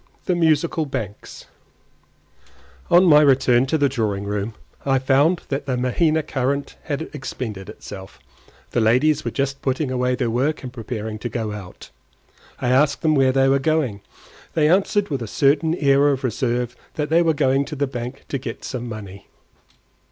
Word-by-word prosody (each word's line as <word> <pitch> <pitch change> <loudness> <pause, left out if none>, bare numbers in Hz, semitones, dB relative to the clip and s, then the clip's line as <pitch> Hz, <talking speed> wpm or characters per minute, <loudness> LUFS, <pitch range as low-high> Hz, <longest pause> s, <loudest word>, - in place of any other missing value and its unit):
THE 185 - +1
MUSICAL 160 -1 +1
BANKS 105 -6 -6 1.4
On 175 +2 +6
my 150 -4 +7
return 130 -3 +4
to 160 - +1
the 145 -2 +3
drawing 110 -7 -2
room, 105 +2 -3 0.3
I 135 -1 +2
found 140 +7 +2
that 140 +1 -3
the 130 -2 0
Mahaina 155 +6 +1
current 140 0 -2
had 145 +1 -2
expended 110 -8 -6
itself. 95 - -10 0.5
The 120 - +1
ladies 140 +7 +3
were - - -2
just 135 0 -2
putting 130 +1 -1
away 125 0 0
their 125 -3 -1
work 140 +6 0
and 125 -1 -7
preparing 110 -2 -5
to 120 - -4
go 110 -3 -3
out. 100 -3 -10 0.7
I 125 - -1
asked 140 +3 +2
them 155 -1 +3
where 135 -3 +4
they 135 0 +3
were 135 +1 +3
going. 135 -8 0 0.5
They 150 -2 +3
answered 195 +3 +2
with 140 -4 -2
a 115 - -4
certain 145 +7 +2
air 140 -2 +3
of 140 -1 0
reserve 120 0 -1 0.2
that 150 0 -2
they 165 +1 +5
were 165 -2 +2
going 135 -1 +2
to 150 - -6
the 140 0 0
bank 125 0 -6
to 140 - -2
get 120 -3 -7
some 125 -2 -5
money. 100 -3 -9
135 Hz, 175 wpm, -22 LUFS, 120-150 Hz, 1.4 s, my